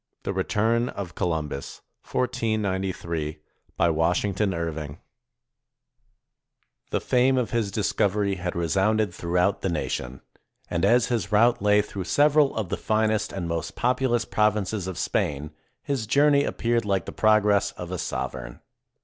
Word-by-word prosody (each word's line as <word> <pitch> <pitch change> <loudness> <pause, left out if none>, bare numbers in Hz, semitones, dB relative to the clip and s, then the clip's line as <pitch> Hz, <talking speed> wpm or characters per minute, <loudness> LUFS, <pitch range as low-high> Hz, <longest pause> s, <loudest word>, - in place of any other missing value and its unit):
THE - - -2
RETURN 115 +3 +1
OF 95 -4 -6
COLUMBUS 80 -6 -3 0.3
BY 95 -10 -2
WASHINGTON 90 +5 +1
IRVING 80 -4 -4 1.9
The - - 0
fame 130 +1 +2
of 125 -3 -1
his 115 -4 0
discovery 100 -1 0
had 90 -1 -4
resounded 95 +4 +1
throughout 90 +3 0
the 95 - -1
nation, 65 -6 -3 0.5
and 85 0 -1
as 120 +4 +4
his 105 -4 -2
route 115 +2 +4
lay 105 0 +4
through 100 -3 -6
several 145 +2 +3
of 110 -6 -2
the - - -2
finest 110 0 0
and 90 -3 -4
most 85 0 -3
populous 120 -1 +1
provinces 105 -2 0
of 95 - -5
Spain, 75 +1 -1 0.3
his 130 -6 -2
journey 140 +2 +4
appeared 120 -1 0
like 100 -3 0
the - - -6
progress 105 -2 +3
of 90 0 -8
a 90 - -3
sovereign. 60 -2 -4
100 Hz, 130 wpm, -25 LUFS, 85-115 Hz, 1.9 s, as